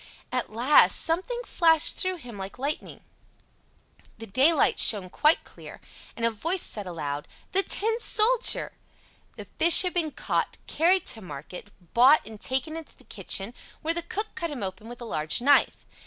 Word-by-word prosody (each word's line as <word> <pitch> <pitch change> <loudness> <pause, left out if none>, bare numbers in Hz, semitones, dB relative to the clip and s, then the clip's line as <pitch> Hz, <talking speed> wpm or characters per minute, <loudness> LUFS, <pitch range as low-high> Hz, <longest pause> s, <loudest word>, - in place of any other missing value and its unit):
At 255 -3 -3
last 245 +7 +4
something 380 +10 0
flashed 325 -2 +2
through 370 -1 +1
him 245 -9 -11
like 195 +2 -8
lightning. 285 +4 -5 1.2
The 225 - -9
daylight 270 +9 +2
shone 190 -5 +4
quite 305 - +2
clear, - - -14 0.4
and 230 - -3
a 230 - +1
voice 335 - -2
said 205 -3 -3
aloud, 150 -4 -6 0.2
"The 385 - +3
Tin 445 +3 -1
Soldier!" 450 +1 +2 0.6
The - - -10
fish 340 +2 +5
had 365 - -3
been 335 -3 -1
caught, - - -3
carried 360 +4 +1
to 225 - -4
market, 180 +3 -10 0.3
bought, 260 +6 +5
and 220 -2 -12
taken 265 +5 -1
into 325 -1 -10
the - - -19
kitchen, 200 +4 -2 0.3
where 325 +1 0
the 340 - -3
cook 420 +6 -5
cut 335 -2 -5
him 280 -8 -7
open 195 +4 -7
with 240 0 -11
a - - -7
large 155 -8 -1
knife. 280 +3 +2
280 Hz, 170 wpm, -25 LUFS, 215-335 Hz, 1.2 s, fish